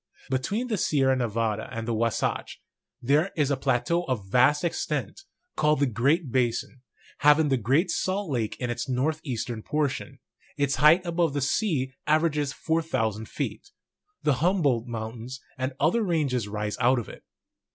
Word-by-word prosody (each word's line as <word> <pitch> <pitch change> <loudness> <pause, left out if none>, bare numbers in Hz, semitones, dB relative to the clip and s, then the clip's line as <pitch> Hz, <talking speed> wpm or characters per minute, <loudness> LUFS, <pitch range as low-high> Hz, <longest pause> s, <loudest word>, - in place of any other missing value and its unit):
Between 195 - -1
the 215 -5 -1
Sierra 135 -5 +2
Ne 125 -2 0
vada 110 -1 -2
and 115 0 -5
the 120 - 0
Wasatch, 115 0 -1 0.4
there 150 +8 +3
is 145 -2 +2
a - - +3
plateau 135 +6 +1
of 120 -7 -2
vast 130 +6 +4
extent, 155 - -2 0.3
called 150 -1 +2
the 140 - +4
Great 135 - +1
Basin, 125 0 -1 0.4
having 150 +1 +5
the 135 - +3
Great 135 - +2
Salt 190 -2 -1
Lake 115 -5 -1
in 125 -2 -2
its 120 +2 -4
northeastern 125 -4 -2
portion; 145 0 -2 0.4
its 140 -1 +1
height 155 +6 +6
above 170 -3 0
the - - +1
sea 135 - 0
averages 150 -2 +2
4,000 130 -11 -1
feet; - - -5 0.5
the 145 -4 +2
Humboldt 145 - +2
Mountains 115 +2 -6 0.2
and 130 +1 -2
other 235 - +3
high 205 - -1
ranges 135 -9 0
rise 105 0 -3
out 125 +1 +4
of 120 - -3
it. - - -11
135 Hz, 160 wpm, -26 LUFS, 120-155 Hz, 0.5 s, height